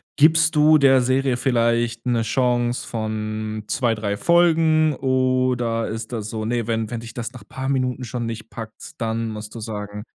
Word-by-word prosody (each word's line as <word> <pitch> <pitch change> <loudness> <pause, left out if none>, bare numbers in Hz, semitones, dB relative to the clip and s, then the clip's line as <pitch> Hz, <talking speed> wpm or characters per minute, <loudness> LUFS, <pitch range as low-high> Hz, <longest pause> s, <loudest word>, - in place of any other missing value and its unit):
gibst 160 +2 +4
du 155 +1 +6
der 135 -2 +5
Serie 130 0 +1
vielleicht 115 -2 0
'ne 120 -2 +1
Chance 120 +1 0
von 110 -1 -4
2, 120 -3 +1
3 105 -2 -2
Folgen 160 0 +3
oder 130 -3 0
ist 110 +2 -6
das 110 -2 -4
so, 110 -1 -4
ne, 120 -1 -1
wenn 110 -1 -1
wenn 115 -1 -4
dich 115 -1 -10
das 120 +1 -5
nach 120 -5 -11
paar 130 0 -5
Minuten 130 -2 -1
schon 120 -1 -4
nicht 115 -1 -6
packt, 115 +6 -9
dann 115 -1 -2
musst 105 0 -8
du 115 - -7
sagen: 105 -1 -6
120 Hz, 175 wpm, -22 LUFS, 110-130 Hz, -, du